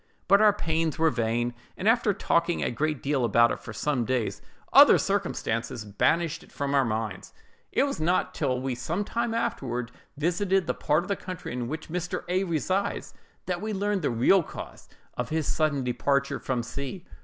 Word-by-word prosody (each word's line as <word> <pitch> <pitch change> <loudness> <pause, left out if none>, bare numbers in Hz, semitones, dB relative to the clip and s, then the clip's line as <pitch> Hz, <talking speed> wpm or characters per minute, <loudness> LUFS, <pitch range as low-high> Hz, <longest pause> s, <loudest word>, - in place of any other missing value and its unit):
But 200 +2 +6
our 215 -1 +7
pains 165 -5 -1
were 160 -1 +3
vain; 120 +1 0 0.2
and 190 - -2
after 225 -2 +4
talking 170 -3 +1
a - - 0
great 150 +3 -2
deal 140 -2 +1
about 120 +1 +4
it - - -3
for - - -9
some 130 +3 -1
days, 120 -1 -1 0.3
other - - +9
circumstances 115 0 -2
banished 160 +11 +1
it - - -18
from 140 0 -2
our 140 -1 +4
minds. 110 -5 -3 0.4
"It - - +3
was 280 - -2
not 175 +4 +1
till 130 -1 0
we 130 0 -2
some 160 +11 -2
time 235 +2 -2
afterward 125 - -2 0.3
visited 180 +4 +1
the - - 0
part 155 +3 +1
of - - -9
the 200 - 0
country 185 -9 -7
in 125 -1 -3
which 155 +5 -6
Mr. 180 +2 -3
A—— 185 +2 +1
resides, 185 +4 -1 0.3
that 180 -1 -2
we 215 0 -3
learned 200 0 0
the - - +1
real 125 +11 +4
cause - - -9 0.3
of - - -3
his 160 -1 -1
sudden 145 -3 0
departure 140 +3 0
from 125 -3 -2
C——. 140 +9 -6
155 Hz, 190 wpm, -27 LUFS, 125-185 Hz, 0.4 s, other